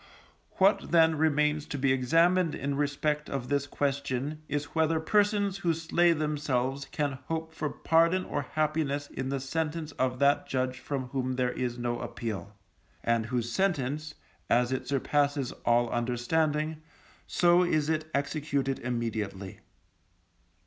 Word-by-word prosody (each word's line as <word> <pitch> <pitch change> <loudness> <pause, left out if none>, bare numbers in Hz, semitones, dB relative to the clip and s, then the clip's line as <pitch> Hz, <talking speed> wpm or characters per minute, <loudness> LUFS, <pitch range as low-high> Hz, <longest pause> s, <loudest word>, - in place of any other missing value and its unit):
What, 195 +2 +3
then, 165 -1 +5
remains 150 -1 +1
to 145 - -4
be 135 0 +2
examined 165 +6 +3
in 140 0 -2
respect 145 +1 -1
of 125 -3 -4
this 140 0 0
question 140 +1 -2
is 145 +1 -3
whether 160 0 +2
persons 205 +2 +2
who 170 -4 +1
slay 170 +2 +3
themselves 145 -4 -1
can 140 -1 -2
hope 160 0 -3
for 155 -2 -2
pardon 165 +5 +2
or 145 - -2
happiness 150 0 -1
in 130 0 -4
the 135 0 -1
sentence 155 +3 -3
of 130 -1 +1
that 140 +2 +3
Judge 130 0 -1
from 130 -3 -4
whom 130 -1 -1
there 125 -1 0
is 125 -1 -3
no 120 0 -2
appeal, 100 -3 -5 0.5
and 115 -1 +1
whose 120 -1 -2
sentence, 155 -4 -1 0.3
as 120 +1 +3
it 130 -1 -2
surpasses 140 0 +1
all 120 0 +4
understanding, 150 +6 0 0.5
so 175 0 +4
is 155 -4 +1
it 155 0 -1
executed 140 -1 -1
immediately. 110 -5 -3
145 Hz, 140 wpm, -29 LUFS, 130-160 Hz, 0.5 s, then